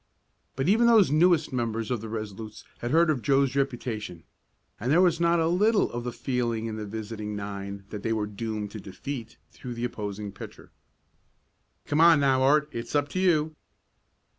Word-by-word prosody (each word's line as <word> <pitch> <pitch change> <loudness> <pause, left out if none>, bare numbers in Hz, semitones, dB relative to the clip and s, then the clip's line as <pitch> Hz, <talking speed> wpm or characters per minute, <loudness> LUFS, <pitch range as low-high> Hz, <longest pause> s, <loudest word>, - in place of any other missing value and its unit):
But 135 +3 -1
even 225 +5 +4
those 220 - +5
newest 160 -1 +3
members 115 -2 -2
of 120 -4 -1
the 110 - -7
Resolutes 110 -1 -6 0.2
had 120 - -3
heard 165 +3 +4
of 135 -5 -2
Joe's 140 0 +2
reputation, 120 -10 -3 0.6
and 120 +5 -1
there 165 - +5
was 175 -3 +3
not 170 0 +3
a 165 - +2
little 205 +5 +2
of 120 0 -4
the 125 - -3
feeling 120 -3 -2
in 110 -1 -4
the 105 -1 -5
visiting 105 0 -5
nine 100 -1 -6
that 105 - -5
they 115 - -2
were 110 -2 0
doomed 105 0 -5
to 110 - -7
defeat 115 +4 -7
through 125 -2 -8
the 120 +1 -2
opposing 105 -3 -5
pitcher. 100 - -11 1.1
"Come 150 +2 +1
on 165 -3 +7
now, 135 -2 +3
Art, 150 +3 +4
it's 115 +4 -5
up 145 0 +1
to 185 - -3
you." 160 -4 +2
120 Hz, 185 wpm, -27 LUFS, 110-150 Hz, 1.1 s, on